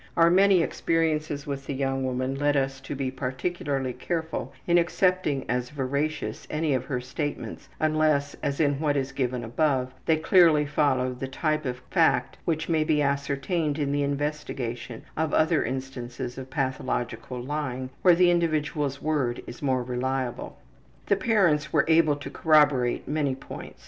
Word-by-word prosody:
Our 170 0 +6
many 190 -1 +5
experiences 155 -4 0
with 140 -1 -5
the 140 - -3
young 135 0 -1
woman 130 +1 -1
led 145 +1 +1
us 135 0 -1
to 135 - -6
be 135 -1 -2
particularly 135 0 -2
careful 160 +5 -3
in 175 0 +4
accepting 175 -5 +1
as 125 0 -1
veracious 145 +2 -3
any 155 -1 0
of 130 - -1
her 130 -4 -2
statements 145 +4 -5
unless, 155 -2 +2
as 140 -1 -2
in 145 -3 +2
what 150 -2 +1
is 135 0 -1
given 125 -3 -2
above, 130 +1 0
they 160 -1 +4
clearly 160 -2 +5
followed 130 -4 +1
the 135 - -3
type 155 +2 -1
of 125 0 -4
fact - - +2
which 160 -1 -1
may 160 -2 +2
be 150 -1 +2
ascertained 140 +3 -1
in 145 -2 -1
the 145 0 +1
investigation 140 -5 -3
of 160 0 0
other 160 0 +3
instances 125 -1 -5
of 130 0 -8
pathological 130 -2 -2
lying 130 -1 -4
where 180 -2 +6
the 175 0 +5
individual's 155 -4 0
word 140 -6 0
is 120 - -10
more 130 -3 +1
reliable. 125 0 -3 0.5
The 200 - +3
parents 175 -10 +2
were - - +3
able 160 -2 +4
to 145 - -8
corroborate 145 -6 +3
many 145 -3 0
points. 135 - -9
145 Hz, 160 wpm, -26 LUFS, 130-155 Hz, 0.5 s, Our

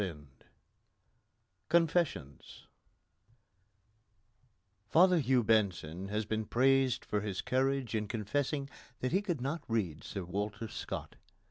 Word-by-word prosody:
XIX 90 -6 -3 1.5
CONFESSIONS 165 - 0 2.2
Father 180 +1 +6
Hugh 130 -3 +3
Benson 95 -5 +1
has 105 +2 -2
been 110 +1 -2
praised 130 +1 +3
for 105 - -1
his 100 -3 -3
courage 135 -1 0
in 105 -1 -1
confessing 135 +6 -1 0.3
that 130 - 0
he 190 +4 +3
could 175 - -2
not 145 +5 -2
read 95 -9 -1
Sir 95 -3 -5
Walter 105 +5 -3
Scott. - - -6
115 Hz, 110 wpm, -32 LUFS, 100-135 Hz, 2.2 s, Father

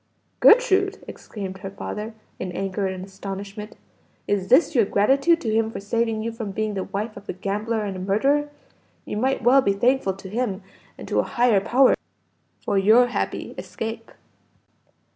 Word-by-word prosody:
"Gertrude!" 405 -4 +5
exclaimed 190 -3 -7
her 195 0 -6
father, 210 +3 -6 0.2
in 185 - -4
anger 195 +1 -2
and 185 0 -5
astonishment, 200 +2 -7 0.5
"is 195 -2 0
this 275 - +4
your 240 -5 +4
gratitude 275 - +3
to 220 -3 -1
him 220 0 +2
for - - -6
saving 225 +2 -1
you 230 - -2
from 225 -2 -6
being 215 +2 -2
the 190 -2 -3
wife 215 +2 -4
of 200 0 -12
a - - -1
gambler 210 +4 -2
and 190 -2 -5
murderer? 280 +9 +2 0.6
You - - -4
might 260 +2 0
well 260 +4 +6
be 200 - +1
thankful 240 0 +1
to 195 0 -11
him 210 -1 -2 0.3
and - - -9
to - - +1
a - - +3
Higher 240 -5 +2
Power, 255 +5 +4 0.7
for 200 - +2
your 225 +5 +5
happy - - -3
escape." 225 0 -6
215 Hz, 165 wpm, -23 LUFS, 195-245 Hz, 0.7 s, well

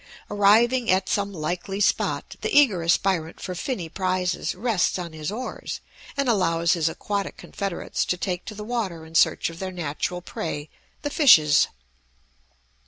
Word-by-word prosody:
Arriving 225 +5 +4
at 185 0 +3
some 200 -1 0
likely 180 +3 -3
spot 205 - 0
the - - -1
eager 255 - +5
aspirant 165 0 +1
for 185 - -5
finny 180 -1 -3
prizes 185 +1 -1
rests 210 -3 +1
on 175 -3 -6
his 155 +2 -4
oars, 250 +4 -5 0.4
and 280 -1 +1
allows 170 -6 +2
his 165 -3 +1
aquatic 200 +4 -3
confederates 195 -4 -3
to 180 - -1
take 180 -1 -3
to 215 - -8
the 210 - -6
water 210 -8 -3
in 160 - -14
search 165 - +3
of 165 - -12
their 190 -1 -4
natural 175 +1 -3
prey, 155 -3 -5 0.3
the 290 - -2
fishes. 155 - +6
185 Hz, 155 wpm, -24 LUFS, 165-210 Hz, 0.4 s, fishes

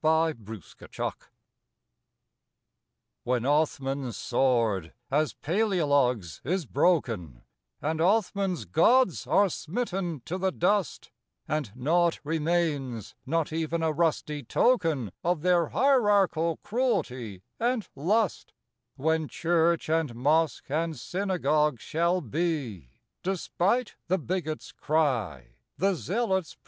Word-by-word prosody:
21 160 +1 +3
CONSTANTINOPLE 110 -6 -7 2.0
When 125 -1 0
Othman's 135 -4 0
sword, 115 -9 +1 0.2
as 150 +2 +1
Paleologue's, 145 - +1
is 175 +4 -1
broken 115 - 0 0.4
And 160 +2 -1
Othman's 195 - +1
gods 190 - +3
are 200 0 +4
smitten 180 - -3
to 180 +3 -3
the 190 0 +1
dust, 190 +1 0 0.4
And 150 -8 -2
naught 165 +6 +2
remains, 150 - -1
not 160 +1 0
even 165 +1 -1
a 160 - +2
rusty 150 -2 0
token 155 - +1
Of 170 -2 0
their 175 -3 +3
hierarchal 205 - +3
cruelty 130 - -2 0.2
and 240 -2 0
lust;— 195 +8 0 0.4
When 160 +2 0
church 170 +1 +1
and 160 -6 0
mosque 150 +3 +1
and 160 0 -1
synagogue 150 - 0
shall 170 +3 0
be, 135 - -2 0.3
Despite 195 +5 0
the 185 +2 +2
bigot's 165 -3 -4
cry, 115 - -1 0.2
the 195 +2 +2
zealot's 190 0 -1
160 Hz, 100 wpm, -27 LUFS, 135-180 Hz, 2.0 s, are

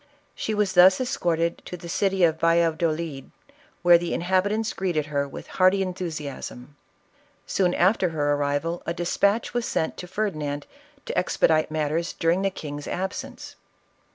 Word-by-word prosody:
She 220 - -3
tvas 205 -2 +1
thus 185 +1 +7
escorted 170 -9 0
to 180 - -7
the 170 - -10
city 195 +2 +1
of 160 -1 +3
Valladolid, 165 -3 +1 0.5
where 175 -1 +7
the 175 0 -2
in - - -3
habiumts 205 +5 +1
greeted 175 -6 -1
her 140 -1 -1
with 140 - -9 0.2
hearty 190 +1 +5
enthusiasm. 150 -7 -6 0.7
Soon 180 -2 +1
after 185 0 +3
her 145 -2 0
arrival 145 +4 -1
a 170 - -1
despatch 200 +5 +1
was 240 -1 -1
sent 160 - -1
to 180 - -7
Ferdinand 155 -8 -3 0.4
to - - -4
expedite 155 -1 +2
matters 155 +2 -1
during 170 +3 +1
the 195 - +1
king's 145 -5 -7
absence. 190 +2 -5
170 Hz, 150 wpm, -25 LUFS, 155-190 Hz, 0.7 s, thus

